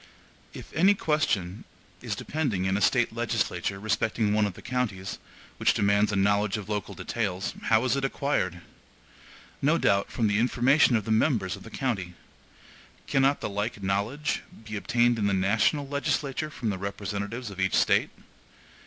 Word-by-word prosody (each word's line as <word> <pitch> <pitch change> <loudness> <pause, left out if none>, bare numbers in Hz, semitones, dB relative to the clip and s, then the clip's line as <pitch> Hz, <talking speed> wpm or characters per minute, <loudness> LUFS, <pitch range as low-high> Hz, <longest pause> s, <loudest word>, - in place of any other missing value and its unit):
If - - -11
any 190 +6 +5
question 120 - 0 0.4
is - - -3
depending 130 -12 -2
in 95 0 +1
a 100 - -1
State - - +2
legislature 95 - -1
respecting 110 0 0
one 105 -1 +3
of 95 - -7
the - - -11
counties, 110 -7 -3 0.4
which - - +2
demands 100 +1 +3
a - - -1
knowledge 100 +1 +2
of 105 -2 -7
local 105 -1 -3
details, 95 -1 -3
how 110 +2 +3
is 130 - +2
it 140 - -2
acquired? 135 - -1 1.0
No 150 +4 +3
doubt 100 -8 +2
from 115 - 0
the 105 0 +2
information 125 +3 +4
of 110 -3 0
the 110 - -2
members 110 - +2
of 100 - -13
the 115 - -11
county. 100 -10 -3 0.9
Cannot 135 +1 +2
the - - -2
like 105 +1 -3
knowledge 105 +10 -1 0.2
be 105 -1 -6
obtained 120 +2 +2
in 100 - +1
the 100 - +1
national 110 +9 +2
legislature 140 +1 -1
from 120 -7 -3
the 95 - -4
representatives 100 +3 -4
of 95 - -10
each 95 -1 +1
State? - - +3
105 Hz, 165 wpm, -27 LUFS, 100-130 Hz, 1.0 s, any